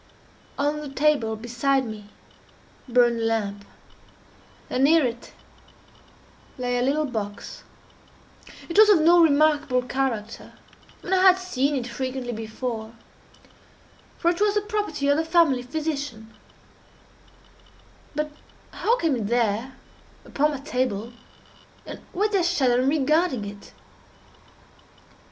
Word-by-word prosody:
_" -, -, -31 dB, 0.5 s
On 295 Hz, +1 st, -1 dB
the 295 Hz, -, -7 dB
table 275 Hz, -5 st, +1 dB
beside 245 Hz, +4 st, 0 dB
me 210 Hz, -2 st, -9 dB, 0.8 s
burned 240 Hz, -1 st, +3 dB
a -, -, -2 dB
lamp, 205 Hz, -3 st, -2 dB, 1.0 s
and 255 Hz, -, -1 dB
near 315 Hz, +1 st, +5 dB
it 240 Hz, -1 st, -5 dB, 1.3 s
lay 245 Hz, -1 st, -1 dB
a -, -, 0 dB
little 285 Hz, +4 st, +1 dB
box. 210 Hz, -6 st, -6 dB, 1.0 s
It 340 Hz, +4 st, +1 dB
was 430 Hz, 0 st, +8 dB
of 400 Hz, -5 st, +6 dB
no 340 Hz, +2 st, +6 dB
remarkable 295 Hz, -4 st, +3 dB
character, 245 Hz, -4 st, -3 dB, 0.5 s
and 370 Hz, -, -2 dB
I 370 Hz, -, +3 dB
had 375 Hz, -1 st, +7 dB
seen 290 Hz, -6 st, -1 dB
it 255 Hz, -3 st, -2 dB
frequently 255 Hz, +1 st, -4 dB
before, 225 Hz, 0 st, -5 dB, 1.2 s
for 340 Hz, -, +2 dB
it 350 Hz, +3 st, -5 dB
was 415 Hz, 0 st, +2 dB
the 415 Hz, -, +2 dB
property 415 Hz, -9 st, -2 dB
of 285 Hz, +1 st, +3 dB
the 320 Hz, -, +1 dB
family 325 Hz, -6 st, +3 dB
physician; 280 Hz, -5 st, -5 dB, 1.8 s
but 300 Hz, 0 st, -2 dB, 0.4 s
how 475 Hz, +2 st, +1 dB
came 325 Hz, -, +1 dB
it 220 Hz, -4 st, -3 dB
there, 235 Hz, +2 st, 0 dB, 0.5 s
upon 295 Hz, +2 st, +1 dB
my 290 Hz, -3 st, -4 dB
table, 245 Hz, -5 st, -2 dB, 0.7 s
and -, -, -8 dB
why 400 Hz, +4 st, 0 dB
did 415 Hz, -2 st, +1 dB
I -, -, +2 dB
shudder 265 Hz, -8 st, +2 dB
in 260 Hz, -, +2 dB
regarding 300 Hz, -4 st, +1 dB
it? 200 Hz, 0 st, -10 dB
270 Hz, 130 wpm, -24 LUFS, 235-315 Hz, 1.8 s, was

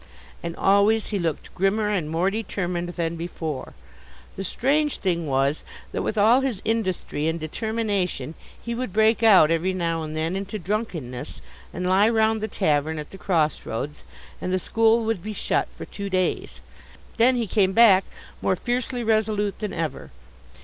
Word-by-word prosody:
And 170 Hz, 0 st, -5 dB
always 200 Hz, +3 st, +3 dB
he 205 Hz, -, -1 dB
looked 165 Hz, -4 st, -3 dB
grimmer 210 Hz, +3 st, +1 dB
and 175 Hz, -7 st, -1 dB
more 170 Hz, +4 st, +1 dB
determined 180 Hz, -5 st, -3 dB
than 170 Hz, -1 st, -2 dB
before. 160 Hz, -4 st, -5 dB, 0.6 s
The 195 Hz, -, -4 dB
strange 290 Hz, -, +1 dB
thing 170 Hz, -4 st, -1 dB
was 135 Hz, +2 st, +1 dB, 0.3 s
that, -, -, -2 dB
with 215 Hz, -, -2 dB
all 225 Hz, +6 st, +5 dB
his 260 Hz, -7 st, -1 dB
industry 190 Hz, -8 st, -1 dB
and 165 Hz, +1 st, -1 dB
determination, 195 Hz, -, -2 dB, 0.3 s
he 235 Hz, -, -5 dB
would 240 Hz, -5 st, -4 dB
break 220 Hz, +1 st, +3 dB
out 190 Hz, -8 st, +7 dB
every 170 Hz, +3 st, +1 dB
now 165 Hz, -3 st, -1 dB
and 155 Hz, 0 st, -5 dB
then 160 Hz, +3 st, -1 dB
into 195 Hz, +2 st, -4 dB
drunkenness, 175 Hz, -, -4 dB, 0.3 s
and 180 Hz, -, -4 dB
lie 190 Hz, +4 st, +4 dB
round 220 Hz, -1 st, +2 dB
the 220 Hz, -, -1 dB
tavern 155 Hz, -4 st, 0 dB
at 150 Hz, -1 st, -7 dB
the 195 Hz, -, -11 dB
crossroads, 150 Hz, -, -1 dB, 0.4 s
and 185 Hz, -, -2 dB
the 185 Hz, -, +2 dB
school 225 Hz, +4 st, +2 dB
would 225 Hz, -5 st, -1 dB
be 215 Hz, +3 st, -5 dB
shut -, -, 0 dB
for -, -, -9 dB
two 200 Hz, -1 st, -6 dB
days. 185 Hz, -1 st, -1 dB, 0.6 s
Then 245 Hz, +2 st, +5 dB
he 235 Hz, -2 st, 0 dB
came 190 Hz, -1 st, +2 dB
back, 195 Hz, -4 st, +7 dB, 0.4 s
more 185 Hz, -, +2 dB
fiercely 245 Hz, +4 st, -2 dB
resolute 215 Hz, -2 st, +1 dB
than 210 Hz, -2 st, -3 dB
ever. 165 Hz, -2 st, -4 dB
195 Hz, 165 wpm, -24 LUFS, 165-220 Hz, 0.6 s, out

